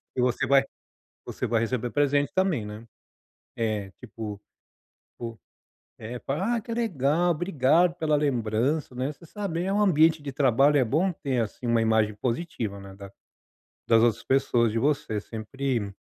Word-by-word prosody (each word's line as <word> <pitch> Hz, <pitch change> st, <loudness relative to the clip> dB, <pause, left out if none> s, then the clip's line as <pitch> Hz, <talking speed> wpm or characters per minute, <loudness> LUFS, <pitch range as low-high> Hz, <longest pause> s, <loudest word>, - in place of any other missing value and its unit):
E 125 Hz, -, 0 dB
você 125 Hz, -1 st, +1 dB
vai 135 Hz, 0 st, +5 dB, 0.6 s
você -, -, -4 dB
vai 115 Hz, -, +1 dB
receber 120 Hz, +1 st, -2 dB
presente 145 Hz, 0 st, +2 dB
também, 185 Hz, -, +1 dB
né. 105 Hz, +2 st, -8 dB, 0.7 s
É, 105 Hz, -4 st, -2 dB
tipo 110 Hz, -4 st, -7 dB, 1.6 s
é, 115 Hz, +3 st, -6 dB
fal 135 Hz, +4 st, -3 dB
"ah, 230 Hz, +4 st, 0 dB
que 230 Hz, -, -8 dB
legal! 175 Hz, -, +1 dB
Obrigado 170 Hz, 0 st, +2 dB
pela 155 Hz, -3 st, +1 dB
lembrança", 130 Hz, 0 st, 0 dB
né. 130 Hz, +4 st, -2 dB
Você 170 Hz, -, -17 dB
sabe, 175 Hz, -1 st, -4 dB
eh, 190 Hz, -, -1 dB
um 210 Hz, -, +2 dB
ambiente 160 Hz, -5 st, +4 dB
de 140 Hz, -, -4 dB
trabalho 135 Hz, +2 st, +3 dB
é 135 Hz, -, +4 dB
bom 165 Hz, +10 st, +1 dB
ter, 135 Hz, -6 st, -2 dB
assim, 115 Hz, +3 st, -5 dB
uma 115 Hz, -1 st, +3 dB
imagem 110 Hz, -1 st, +2 dB
positiva, 115 Hz, -, -3 dB
né, 100 Hz, -1 st, -11 dB
das 100 Hz, 0 st, -11 dB, 0.8 s
das 115 Hz, -1 st, +5 dB
outras 115 Hz, -1 st, +2 dB
pessoas, 120 Hz, -4 st, +2 dB
de 115 Hz, -, -1 dB
você 140 Hz, -6 st, 0 dB
sempre 115 Hz, -1 st, -3 dB
130 Hz, 155 wpm, -26 LUFS, 115-155 Hz, 1.6 s, vai